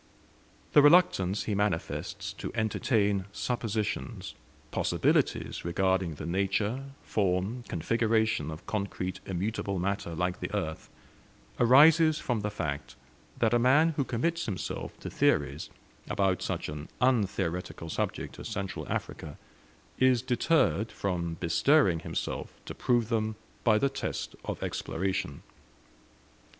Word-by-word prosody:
The 145 - +8
reluctance 145 - +4
he 105 - -2
manifests 100 -4 -2
to - - -6
entertain 105 -3 +1
suppositions, 110 -1 -3 0.4
possibilities - - +1
regarding 95 -1 +1
the 75 - -7
nature, 100 +8 0 0.2
form, 100 +4 0
configuration 110 -2 +1
of 80 +2 -8
concrete 100 -3 -3
immutable 100 +1 -2
matter 95 -2 -2
like 90 +1 -1
the - - -4
earth, 80 -6 -3 0.7
arises 155 +5 +7
from 120 -3 -1
the 105 0 -2
fact, 75 -9 -4 0.4
that 115 -1 +2
a 120 - +4
man 140 +7 +5
who 145 -3 0
commits 160 +7 -1
himself 95 -4 -4
to - - -6
theories 70 +1 +1 0.4
about 95 -2 +1
such - - -2
an 75 0 -7
untheoretical 95 -9 0
subject - - -3
as - - -6
Central 100 -1 -4
Africa - - -4 0.6
is 130 -2 +4
deterred 125 -4 +2
from 90 -5 -2
bestirring 90 - +3
himself - - -4
to - - -6
prove 120 -3 +1
them 110 -2 0 0.3
by 110 -2 +5
the 140 - +3
test 135 - -4
of - - -4
exploration. 95 -4 -2
100 Hz, 120 wpm, -29 LUFS, 90-120 Hz, 0.7 s, The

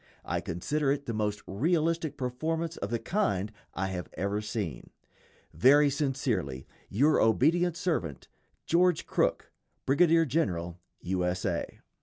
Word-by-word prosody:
I - - -1
consider 135 - -1
it 140 0 -2
the 115 - -3
most 105 -1 -2
realistic 160 - 0
performance 160 +6 -2
of 100 - -4
the 115 - 0
kind 115 - -1 0.2
I 95 0 -1
have 90 -2 -5
ever 100 +2 -1
seen. 105 - -4 0.6
Very 140 - +5
sincerely, 125 - -1 0.2
your 145 +9 +3
obedient 165 +9 +3
servant, 90 - -2 0.4
GEORGE 175 0 +3
CROOK, - - 0 0.3
_Brigadier 165 +3 +4
General 90 - -1 0.2
U. 90 0 -1
S. 90 +1 -1
A. 85 -3 -3
125 Hz, 130 wpm, -29 LUFS, 95-160 Hz, 0.6 s, Very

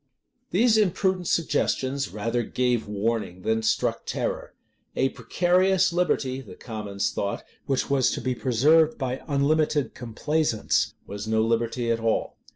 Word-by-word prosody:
[*] - - -49
These 220 +4 +4
imprudent 190 -3 +1
suggestions 140 -4 0
rather 115 +3 -1
gave 120 -1 0
warning 105 -3 -2
than 110 0 +1
struck 110 - 0
terror. - - -3 0.4
A 135 - +2
precarious 180 +9 +2
liberty, 135 -7 0
the 100 -8 -12
commons 105 -4 -3
thought, 100 - -3 0.2
which 135 -2 0
was 140 -2 +3
to - - -3
be 130 - -1
preserved 150 +6 +3
by 130 -1 -3
unlimited 150 0 +1
complaisance, 125 +1 0
was 100 +2 -6
no 110 0 +2
liberty 115 +1 0
at 115 - 0
all. 115 -1 -1
130 Hz, 140 wpm, -25 LUFS, 115-155 Hz, 0.4 s, These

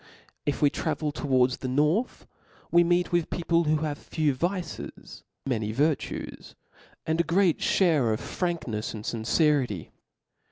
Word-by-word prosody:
If 145 - 0
we 145 - +5
travel 150 -2 -2
towards 130 -3 +1
the 130 - -5
nwth, 150 - +1 0.5
we 170 0 +6
meet 175 +1 +1
with 175 -2 +1
people 170 -1 +1
who 155 0 +1
have 150 -1 -3
few 155 -3 0
vices, 175 +4 -4 0.2
many 110 -5 -1
virtues, 145 +6 -2 0.5
and 160 +1 +2
a - - 0
great 175 -1 +2
(hare 155 - +3
of 110 - -1
franknefs 130 - -3
and 105 0 -8
fincerity. 120 - +1
150 Hz, 135 wpm, -27 LUFS, 130-170 Hz, 0.5 s, we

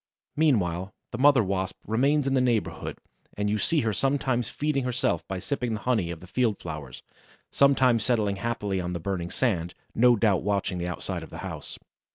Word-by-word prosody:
Meanwhile 100 - +1 0.2
the 120 - -5
mother 140 -3 +6
Wasp 95 -1 -2
remains 135 +7 +2
in 135 - +1
the 130 - +3
neighborhood 120 -4 -1 0.4
and 105 0 0
you 105 - 0
see 160 +5 +2
her 110 -2 0
sometimes 130 -2 0
feeding 145 -2 -1
herself 125 -10 0
by 95 - -3
sipping 120 +3 -2
the 110 - -6
honey 110 -7 +1
of 85 -2 -6
the - - -10
field 110 +2 0
flowers, 75 -6 -7 0.5
sometimes 130 -4 +4
settling 105 -6 +1
happily 100 -3 -2
on 90 0 -3
the 85 - -3
burning 85 0 -3
sand, 90 -9 -1 0.2
no 120 +1 +5
doubt 105 -4 +2
watching 100 -2 -1
the 85 - -2
outside 90 - -4
of - - -9
the - - -9
house. - - -7
110 Hz, 190 wpm, -27 LUFS, 95-125 Hz, 0.5 s, mother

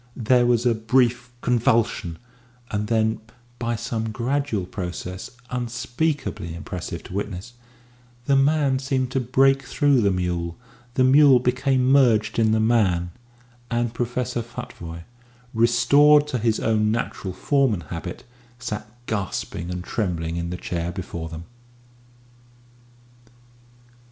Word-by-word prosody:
There 120 +1 +3
was 120 0 +2
a 120 - +4
brief 120 +2 +1
convulsion, 115 -7 +1 0.5
and 105 0 -1
then, 110 -1 +1 0.4
by 120 0 -1
some 115 -1 -3
gradual 120 -2 -1
process 90 0 -6 0.2
unspeakably 120 - -2
impressive 85 -3 -6
to - - -10
witness, 100 +3 -4 0.7
the 140 - +3
man 140 -1 +3
seemed 130 -2 -1
to 135 - +1
break 135 +2 +3
through 135 0 +2
the 100 - +3
mule, 90 -2 -2 0.4
the 130 - +3
mule 135 0 +7
became 130 +1 +1
merged 115 -6 +4
in 110 -1 +3
the 110 - +2
man 100 -7 +2 0.6
and 120 -1 -1
Professor 120 +1 -2
Futvoye, 85 -8 -8 0.5
restored 140 +6 +5
to 125 - -1
his 115 -1 +1
own 110 -1 +2
natural 110 -4 -3
form 135 +7 +2
and 90 -5 -3
habit, 85 +3 -7 0.3
sat 110 -3 -5 0.2
gasping 95 -5 -3
and 90 0 -4
trembling 85 -6 -2
in 85 0 -3
the 90 - -4
chair 85 -1 -3
before 85 -3 -6
them. 80 0 -7
115 Hz, 125 wpm, -23 LUFS, 95-125 Hz, 0.7 s, mule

